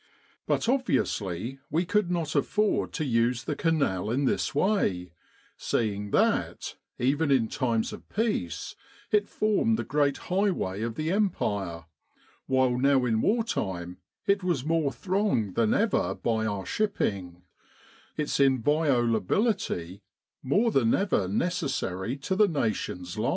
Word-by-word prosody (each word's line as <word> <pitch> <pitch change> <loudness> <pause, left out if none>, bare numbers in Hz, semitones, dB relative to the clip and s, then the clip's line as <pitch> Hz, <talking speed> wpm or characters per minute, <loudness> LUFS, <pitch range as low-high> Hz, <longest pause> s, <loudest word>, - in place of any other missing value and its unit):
But - - 0
obviously 130 - -1
we 170 +3 +1
could 210 0 +1
not 170 -4 -1
afford 210 +9 +1
to 155 - -2
use 115 -1 +1
the 150 - -3
Canal 140 - 0
in 135 +5 +1
this 135 - 0
way, 120 - +1 0.5
seeing 105 -3 -1
that, - - 0 0.2
even 145 +5 +1
in 130 -5 +3
times 115 -3 -1
of - - -11
peace, 200 - -2 0.4
it 210 -1 +2
formed 215 +1 +1
the - - -2
great 145 -1 +1
highway 180 - -1
of 115 0 -3
the 155 +4 -2
Empire, 100 - -1 0.6
while 130 -2 +2
now 135 -1 +3
in 110 -2 +1
war 230 +2 +2
time 90 - -3 0.3
it 200 -1 +2
was 170 -8 0
more 160 -3 +1
thronged 180 - 0
than 115 0 +2
ever 225 -1 +1
by 110 -2 -1
our 100 -2 -3
shipping, 95 - -2 0.7
its 150 -2 -1
inviolability 130 - +1 0.4
more 205 - +2
than 120 - +3
ever 185 - +1
necessary 125 - -2
to 145 +7 -2
the 210 +1 +5
Nation's 110 - -2
life. 115 - +1
135 Hz, 135 wpm, -27 LUFS, -, 0.7 s, the